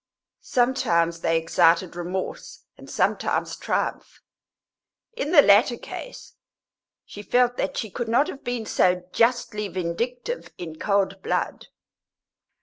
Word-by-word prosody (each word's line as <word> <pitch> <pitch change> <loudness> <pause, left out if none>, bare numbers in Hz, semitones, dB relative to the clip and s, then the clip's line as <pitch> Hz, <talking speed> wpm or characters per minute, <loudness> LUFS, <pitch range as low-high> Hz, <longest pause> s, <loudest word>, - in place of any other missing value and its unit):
Sometimes 170 -10 +1
they 165 -1 +1
excited 165 +2 +2
remorse, 180 +2 -5
and - - -14
sometimes - - 0
triumph; - - -3 0.9
in 300 - -3
the 295 -5 +8
latter 220 +4 +5
case - - -9 0.7
she 205 - -10
felt 245 +4 +2
that - - -2
she 220 -4 -3
could 240 +4 -4
not 260 +6 +3
have 275 - -8
been 245 -2 -3
so 180 -3 +2
justly 230 -3 +1
vindictive 230 - -4
in 160 -3 -8
cold 195 -1 0
blood. - - -2
205 Hz, 120 wpm, -24 LUFS, 175-245 Hz, 0.9 s, the